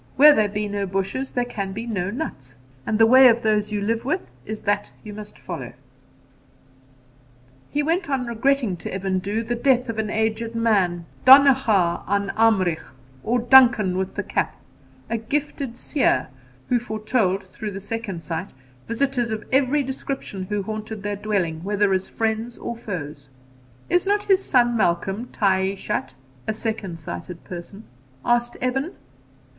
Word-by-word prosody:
Where 295 +3 +9
there 215 -5 +2
are 210 0 -2
no 200 -1 -2
bushes 195 +8 -2
there 245 -1 -1
can 200 -5 -4
be 225 +4 -5
no 200 -6 -2
nuts, 135 - -6 0.3
and 215 - +1
the 225 - +6
way 260 +3 +8
of 235 -1 +3
those 210 -1 +1
you 210 -1 -1
live 225 +3 -1
with 130 - -2 0.2
is 215 0 -5
that 205 0 -1
you 210 - -8
must 210 0 -9
follow,' - - -7 2.0
He 295 +1 0
went 330 +3 0
on 265 -3 0
regretting 235 -3 +1
to - - -7
Evan 190 0 -1
Dhu 205 +4 -2
the 240 - -2
death 250 0 +2
of 225 -1 -3
an 215 -1 -1
aged 220 +1 -1
man, 190 -7 +1 0.2
Donnacha 255 -10 +6
an 200 0 0
Amrigh, 195 -7 +3 0.4
or 240 +2 +1
Duncan 240 -6 +6
with 190 0 -2
the - - -2
Cap, - - -2 0.5
'a 230 - -1
gifted 275 0 -3
seer,' 255 - +1 0.4
who 245 - +3
foretold, 215 -4 0
through 210 +3 -6
the 195 -1 -6
second 205 -4 -5
sight, 165 +3 -5 0.3
visitors 245 0 0
of 220 -1 -3
every 275 +2 +3
description 265 -7 -5
who 205 +1 -2
haunted 215 0 -6
their 205 0 -2
dwelling, 190 -6 -2
whether 205 0 +1
as 190 0 -1
friends 225 +1 -2
or 235 - -5
foes. 150 - -7 0.6
'Is 355 +2 +1
not 410 +1 +2
his 390 -1 +3
son 240 -2 +3
Malcolm 195 +3 0
taishatr 190 - -1 0.3
(a 220 - -1
second 210 -6 -4
sighted 155 - -7
person)?' 185 +4 -9 0.4
asked 240 0 +1
Evan. 270 +6 -1
220 Hz, 160 wpm, -23 LUFS, 195-245 Hz, 2.0 s, Where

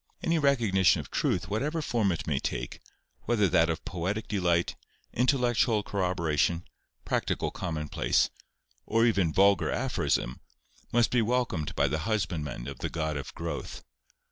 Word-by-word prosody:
Any 165 -1 +2
recognition 115 - +3
of - - -8
truth, 90 0 0
whatever 140 - -1
form 115 -9 +1
it 85 - -3
may 75 -3 0
take, - - -4 0.5
whether 105 -4 +3
that 85 -1 +4
of 80 - -3
poetic 100 +4 -3
delight, 90 -4 +1 0.4
intellectual 120 -3 +2
corroboration, 85 -4 0 0.4
practical - - -1
commonplace; 75 -4 0 0.6
or 115 +1 +3
even 100 -8 +2
vulgar 100 +3 +4
aphorism, 120 - -1 0.5
must 120 -1 +3
be 125 - +3
welcomed 115 - -1
by 70 - +3
the 75 +3 -1
husbandmen 85 - -2
of 70 -3 -7
the - - -2
God 80 -2 -2
of 70 - -5
growth. - - -5
95 Hz, 140 wpm, -28 LUFS, 80-115 Hz, 0.6 s, that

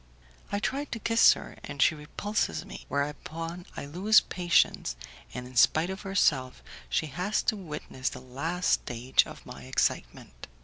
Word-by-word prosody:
I 200 - 0
try 275 +7 -1
to 250 - -5
kiss 230 +1 +6
her, - - -10
and 140 -1 -8
she 140 - +5
repulses 150 - -2
me, - - -10
whereupon 165 +5 -4
I - - -4
lose 190 +9 +5
patience, 175 - +1 0.4
and 125 0 -6
in 125 0 -12
spite 160 +8 +4
of 190 - -6
herself 150 -10 +1 0.3
she - - +1
has 180 +8 -1
to - - +1
witness 150 -8 -4
the - - -8
last 145 +8 -2
stage 125 +2 +2
of - - -11
my 65 -1 -10
excitement. 60 -1 -2
155 Hz, 160 wpm, -28 LUFS, 130-190 Hz, 0.4 s, kiss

